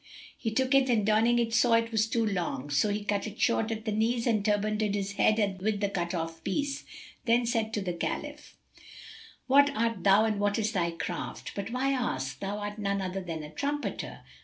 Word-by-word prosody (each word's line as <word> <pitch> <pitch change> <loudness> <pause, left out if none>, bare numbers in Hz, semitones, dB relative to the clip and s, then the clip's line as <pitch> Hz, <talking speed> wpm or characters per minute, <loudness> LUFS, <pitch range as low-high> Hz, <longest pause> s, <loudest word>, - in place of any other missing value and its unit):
He 225 - -3
took 260 +4 +1
it 270 -1 +4
and 220 -4 +2
donning 220 +3 +4
it 230 -1 0
saw 240 0 +4
it 230 0 +3
was 220 -1 +2
too 230 0 +1
long; 175 -8 -2
so 145 +9 +2
he 205 0 -2
cut 205 +1 -1
it 215 +1 -9
short 230 -2 +2
at 220 -1 -4
the 215 - -1
knees 230 +3 +1
and 220 -4 +2
turbanded 210 0 +1
his 200 0 -2
head 205 -2 +1
with 210 0 0
the 200 -1 0
cut 175 -2 -2
off 165 -1 -4
piece; 280 +7 -2 0.4
then 235 0 +3
said 225 -2 0
to 210 - -1
the 180 -2 -2
Caliph, 170 - -5 0.9
"What 280 +2 +6
art 230 -4 0
thou 200 +2 +6
and 215 -2 0
what 205 0 +1
is 215 -1 0
thy 175 -6 0
craft? 170 +1 -5
But 200 +1 -4
why 255 +3 0
ask? 135 - -2
Thou 200 +1 -3
art 205 +1 -5
none 200 -1 0
other 190 0 -3
than 165 -4 -5
a 150 - -9
trumpeter." 290 - -3
215 Hz, 210 wpm, -29 LUFS, 195-230 Hz, 0.9 s, What